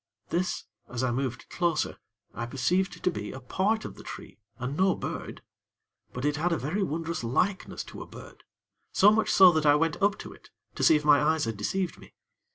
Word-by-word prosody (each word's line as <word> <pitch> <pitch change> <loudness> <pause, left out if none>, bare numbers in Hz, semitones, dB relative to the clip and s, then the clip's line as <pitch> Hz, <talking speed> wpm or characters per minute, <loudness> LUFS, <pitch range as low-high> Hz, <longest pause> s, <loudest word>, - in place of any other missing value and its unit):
This, 175 +3 -1 0.3
as 125 0 -3
I 125 - +1
moved 130 0 -3
closer, 170 -3 0 0.3
I 115 +1 -4
perceived 180 +10 0
to 180 - +2
be 105 -9 -5
a 130 - -8
part 200 - 0
of - - -6
the - - -10
tree, - - -9 0.2
and 130 +2 -4
no 190 +2 +3
bird; - - -6 0.7
but 125 +2 -4
it 145 0 +1
had 175 +4 0
a 165 - +2
very 155 +10 -2
wondrous 165 -4 -2
likeness 180 +12 -1
to - - -10
a - - -8
bird; - - -13 0.5
so 205 +2 +6
much 220 0 +2
so 190 -2 +8
that 155 -2 +1
I 145 - +7
went 165 +1 0
up 200 0 +3
to - - -9
it, - - -18 0.2
to - - -6
see 160 - +7
if 150 0 0
my 145 -1 +6
eyes 155 -1 +2
had 115 -1 -3
deceived 175 - -2
me. - - -16
160 Hz, 210 wpm, -28 LUFS, 130-185 Hz, 0.7 s, so